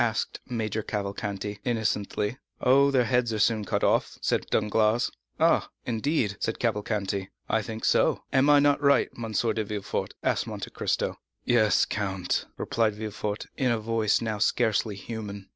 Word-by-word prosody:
asked 115 -1 -1
Major 110 -2 -2
Cavalcanti 100 0 -4
innocently. 110 -1 -1 0.2
"Oh, 140 +2 +5
their 130 -3 +3
heads 125 -1 +1
are - - -1
soon 110 0 +2
cut - - -1
off," - - +2
said - - 0
Danglars. 110 +2 +2 0.3
"Ah, - - +3 0.2
indeed?" 115 -3 0
said 110 - -2
Cavalcanti. 105 -4 -1 0.2
"I 110 - +1
think 110 +1 -5
so; - - +3
am 135 +2 +4
I 145 - +7
not 145 0 +3
right, 140 -1 +4
M. 115 -2 -5
de 110 0 +1
Villefort?" 105 -1 -4
asked - - +1
Monte - - -6
Cristo. - - -1 0.3
"Yes, 110 -3 +4
count," 95 -4 -2
replied 110 -2 0
Villefort, 105 -1 -4
in 130 -2 +2
a 115 - +2
voice 110 -1 +1
now 110 -2 -2
scarcely 110 -1 +1
human. 100 -2 -7
110 Hz, 155 wpm, -27 LUFS, 105-120 Hz, 0.3 s, I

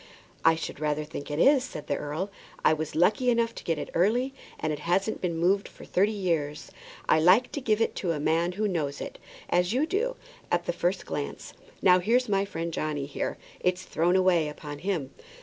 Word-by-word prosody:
"I 165 - +6
should 160 - -6
rather 150 0 0
think 150 -1 -7
it 145 - -3
is," 270 - +5
said 205 - -7
the - - -1
earl. 155 +7 -3 0.3
"I - - +6
was 155 0 -4
lucky 210 +9 +3
enough 230 -1 +2
to - - -9
get 165 -2 0
it - - -5
early, 240 +10 +2 0.3
and 155 0 -1
it 150 - -5
hasn't 185 +7 0
been 170 -3 -1
moved 190 +4 +2
for - - -13
thirty 200 +4 +2
years. 165 -8 -2 0.4
I - - +5
like 185 +10 +5
to 285 - -4
give 220 -3 +1
it - - +2
to 180 - 0
a 155 - -2
man 165 +4 +1
who 210 +3 0
knows 155 -7 -2
it, - - -7 0.3
as 180 +3 +2
you 270 +5 +2
do, 440 +9 -1 0.4
at 175 0 +1
the - - -1
first 175 +2 -1
glance. 145 - -5 0.3
Now 180 -1 +7
there's 245 +7 +2
my 195 -1 +2
friend 170 -3 -4
Johnny 150 -3 -2
there; - - -2 0.2
it's 180 +1 0
thrown 175 +1 +1
away 180 -4 +3
upon 150 -1 -8
him." 165 -6 -2
175 Hz, 210 wpm, -27 LUFS, 155-205 Hz, 0.4 s, Now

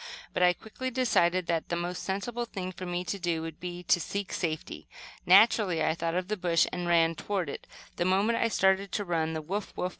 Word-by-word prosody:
But - - -1
I 180 0 +6
quickly 240 +7 -6
decided 185 -8 +2
that 165 -1 -1
the 170 - 0
most 175 +1 -3
sensible 230 +5 -3
thing 185 -5 -5
for 185 0 -7
me 175 0 -2
to 200 +2 -4
do 170 -2 -1
would 165 -1 -7
be 175 0 -6
to 175 - +3
seek 200 +3 -4
safety. 160 -3 -4 0.4
Naturally 190 -3 +5
I 160 - +2
thought 165 0 -2
of 180 0 -1
the 215 +1 -2
bush, 175 -3 +3
and 180 -1 -3
ran 165 -1 +4
toward 185 -2 -3
it. - - -9 0.3
The 175 - 0
moment 200 +5 +2
I 230 - +3
started 195 -2 +2
to 205 - -1
run 160 -2 -1
the 160 -1 -4
"woof, 195 +6 -4
woof!" 180 - -1
180 Hz, 220 wpm, -29 LUFS, 170-200 Hz, 0.4 s, I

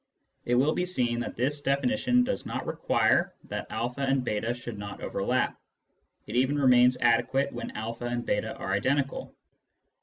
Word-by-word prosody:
It 120 - +2
will 140 +5 +3
be - - 0
seen 125 -10 0
that 120 - -4
this 145 +5 -1
de 140 0 +2
finition 250 - +2
does 255 - -2
not - - -4
require - - +1
that - - -5
a - - -2 0.2
and 135 -2 +1
j8 110 +2 -1
should 120 -3 -7
not 100 0 -7
overlap; 125 +6 0 0.7
it - - -6
even 130 +4 +2
remains 125 -2 +5
adequate 120 +4 +2
when - - -5
a 110 - -3 0.2
and 120 0 -2
j8 110 +2 -1
are 95 - -2
identical. 135 +7 -1
125 Hz, 170 wpm, -28 LUFS, 120-140 Hz, 0.7 s, remains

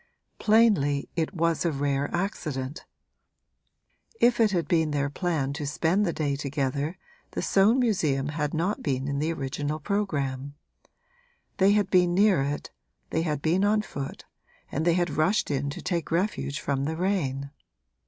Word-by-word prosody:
Plainly, 205 -11 +3
it 165 +3 -1
was 165 -2 +1
a 170 - +1
rare 140 0 -1
accident: 155 -6 -3 1.3
if 240 0 +4
it 225 -2 +5
had 175 -4 -1
been 160 -2 +2
their 145 -1 -1
plan 150 -5 -1
to 150 -1 -4
spend 170 +7 +1
the - - +1
day 145 -4 -1
together 140 +3 -2 0.4
the - - -2
Soane 205 +5 +4
Museum 155 - +1
had 150 -1 -2
not 175 +6 -1
been 135 -2 -1
in 140 0 -1
the 155 +3 0
original 145 +1 -3
programme. 145 -8 -2 1.0
They 195 +1 +5
had 205 -2 +1
been 180 -2 +4
near 195 -5 +4
it, 145 +2 -3 0.4
they 160 - +1
had 150 -4 -2
been 175 +5 +2
on 210 +1 +3
foot 140 -8 -6 0.5
and 155 +3 -1
they 170 -1 +4
had 175 -1 +1
rushed 160 +3 +1
in 140 0 -1
to 140 - -7
take 175 -4 -2
refuge 170 -4 -1
from 140 -1 -1
the 160 +2 -2
rain. 140 -8 -1
160 Hz, 160 wpm, -27 LUFS, 140-185 Hz, 1.3 s, it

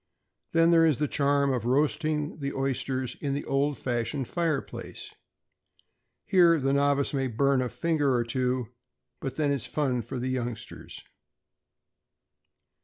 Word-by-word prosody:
Then 165 0 +5
there 165 -1 +6
is 155 -5 +3
the 150 - 0
charm 140 -1 +2
of 120 -3 -2
roasting 150 +3 0
the 140 -1 -3
oysters 130 -1 -2
in 140 -2 -1
the 145 - -4
old 140 +1 0
fashioned 120 +1 -2
fire 165 -5 0
place. - - -9 1.1
Here 170 -3 +5
the 135 0 +1
novice 140 +1 +2
may 135 -1 0
burn 135 +3 +2
a 125 - -1
finger 155 -3 0
or 120 - +2
two, 125 0 -1 0.5
but 135 -1 -5
then 145 -1 +1
it's 140 -5 0
fun 130 -5 0
for 130 +3 -6
the 125 +1 -2
youngsters. 120 -3 -5
140 Hz, 145 wpm, -27 LUFS, 130-150 Hz, 1.1 s, there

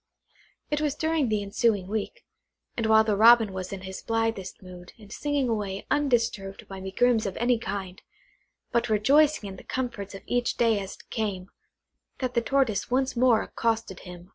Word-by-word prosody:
It 295 0 0
was 295 -2 0
during 315 -5 0
the 210 -1 0
ensuing 200 -1 +1
week, 220 - -4 0.5
and 230 -2 -1
while 220 0 +6
the 215 -2 +1
Robin 225 -1 +6
was 185 -1 -5
in 195 -1 -6
his 190 0 -7
blithest 225 -5 -2
mood, 180 -1 -12
and 210 -2 -15
singing 290 0 -1
away 205 -4 -3
undisturbed 230 -8 0
by 195 -1 -8
megrims 220 +3 +1
of 190 - -5
any 240 0 +2
kind, 190 -4 -5 0.7
but 235 -1 +1
rejoicing 275 +4 +3
in 190 -1 -8
the - - -12
comforts 230 -6 -4
of 195 - -10
each 245 0 -1
day 225 -3 +3
as 195 -1 -6
it - - -20
came, 200 -5 -3 0.7
that 255 -2 -3
the 235 - +2
Tortoise 245 -5 0
once 260 +2 0
more 240 -2 +4
accosted 225 -5 -2
him. 180 0 -11
220 Hz, 175 wpm, -26 LUFS, 195-245 Hz, 0.7 s, while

